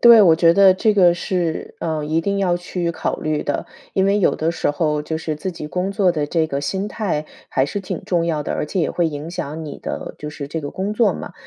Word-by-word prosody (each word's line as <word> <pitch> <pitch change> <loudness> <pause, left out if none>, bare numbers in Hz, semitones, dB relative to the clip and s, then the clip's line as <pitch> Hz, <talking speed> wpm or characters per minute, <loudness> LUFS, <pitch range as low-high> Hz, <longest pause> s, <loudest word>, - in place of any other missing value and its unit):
对， 235 -2 +9
我 170 -4 +7
觉 165 +1 +5
得 195 -1 +7
这 215 +3 +2
个 180 -4 +6
是， 175 -2 -2
呃， 160 -2 -2
一 155 +2 +1
定 200 +3 -1
要 180 -3 +2
去 175 0 -3
考 170 - -2
虑 155 -1 -1
的， 145 - -2 0.3
因 190 - +2
为 200 +1 +3
有 200 - +3
的 160 +1 0
时 170 - 0
候， 150 0 0
就 160 +1 -3
是 155 -1 -3
自 185 +4 -4
己 160 -3 -7
工 180 +5 -2
作 195 -3 +3
的 150 -3 -1
这 160 +1 +1
个 140 -2 -2
心 190 +8 -2
态 175 -9 -2 0.2
还 130 - +2
是 205 - -3
挺 190 - -5
重 170 -2 +1
要 155 -3 0
的， - - -3
而 - - -1
且 185 - -1
也 160 - +1
会 175 - +1
影 150 +1 -5
响 160 -2 -5
你 150 - -7
的 - - -5
就 150 - -6
是 145 -2 -7
这 160 +1 -3
个 145 - -5
工 195 +2 -3
作 230 +1 +3
嘛。 - - -7
170 Hz, 275 characters per minute, -21 LUFS, 150-190 Hz, 0.3 s, 对